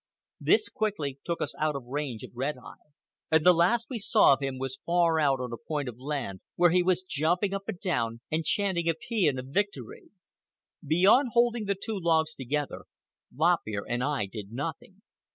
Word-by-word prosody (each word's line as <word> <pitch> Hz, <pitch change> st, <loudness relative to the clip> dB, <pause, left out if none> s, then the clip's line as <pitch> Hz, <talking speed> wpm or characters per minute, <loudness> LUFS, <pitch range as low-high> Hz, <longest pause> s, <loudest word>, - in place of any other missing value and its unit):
This -, -, +3 dB
quickly 155 Hz, -11 st, -3 dB
took 170 Hz, -1 st, -2 dB
us -, -, -4 dB
out 155 Hz, -1 st, +1 dB
of 135 Hz, -3 st, -6 dB
range 130 Hz, -3 st, -4 dB
of -, -, -9 dB
Red 135 Hz, +4 st, -2 dB
Eye, 125 Hz, -, -14 dB, 0.4 s
and 160 Hz, -1 st, +3 dB
the 180 Hz, -, +8 dB
last 185 Hz, +8 st, +2 dB
we 250 Hz, -4 st, -4 dB
saw 195 Hz, -, +5 dB
of 135 Hz, -, -2 dB
him 135 Hz, -1 st, -3 dB
was 135 Hz, 0 st, -5 dB
far 170 Hz, -2 st, +2 dB
out 140 Hz, -3 st, +2 dB
on 125 Hz, -2 st, -4 dB
a -, -, -4 dB
point 150 Hz, -1 st, -4 dB
of 120 Hz, -1 st, -7 dB
land, 130 Hz, -9 st, -4 dB
where 175 Hz, -1 st, +4 dB
he 180 Hz, +1 st, +4 dB
was 180 Hz, 0 st, +1 dB
jumping 180 Hz, +4 st, 0 dB
up 195 Hz, 0 st, -4 dB
and 180 Hz, -, -4 dB
down 115 Hz, -, -1 dB
and 160 Hz, +1 st, 0 dB
chanting 175 Hz, -1 st, +1 dB
a 165 Hz, -, +1 dB
paean 165 Hz, -, 0 dB
of 130 Hz, +1 st, -6 dB
victory. 210 Hz, -, -3 dB, 0.7 s
Beyond 190 Hz, -, +4 dB
holding 235 Hz, -2 st, +2 dB
the 200 Hz, 0 st, 0 dB
two 215 Hz, -1 st, -4 dB
logs 160 Hz, -2 st, +2 dB
together, 140 Hz, +2 st, -3 dB, 0.5 s
Lop 165 Hz, +6 st, +3 dB
Ear 100 Hz, -2 st, -3 dB
and 120 Hz, +1 st, -1 dB
I 140 Hz, -6 st, 0 dB
did 100 Hz, 0 st, -8 dB
nothing. 160 Hz, -, -6 dB
160 Hz, 195 wpm, -28 LUFS, 135-185 Hz, 0.7 s, the